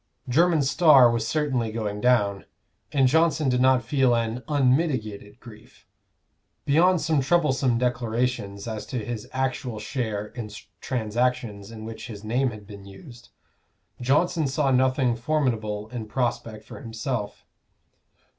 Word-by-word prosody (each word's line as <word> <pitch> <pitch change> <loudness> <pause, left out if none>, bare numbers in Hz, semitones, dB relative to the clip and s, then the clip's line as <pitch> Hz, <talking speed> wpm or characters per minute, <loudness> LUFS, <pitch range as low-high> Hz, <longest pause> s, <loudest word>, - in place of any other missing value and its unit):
Jermyn's 155 +2 +3
star 140 -6 +6
was 115 -1 -1
certainly 135 -7 -1
going 105 -2 -4
down, 105 -5 +2 0.5
and 135 -2 +3
Johnson 160 0 +2
did 125 0 +1
not 130 -1 +4
feel 130 0 +2
an 115 +1 -2
unmitigated 130 -7 0
grief. 110 -4 -16 0.8
Beyond 175 +5 +4
some 155 -3 +1
troublesome 135 -5 +2
declarations 120 -4 -2
as 110 -2 -5
to 120 -5 -4
his 115 -3 -6
actual 130 -3 -2
share 105 -2 -4
in 115 -4 -7 0.3
transactions 120 -3 -2
in 110 -1 -9
which 115 +2 -8
his 105 -3 -9
name 125 +5 0
had 105 -3 -10
been 100 -1 -11
used, 120 - -13 0.7
Johnson 155 +5 +1
saw 135 0 0
nothing 130 -1 +2
formidable 115 -6 -1
in 115 -3 -6
prospect 115 -2 -3
for - - -11
himself. 115 -2 -5
125 Hz, 130 wpm, -25 LUFS, 110-135 Hz, 0.8 s, star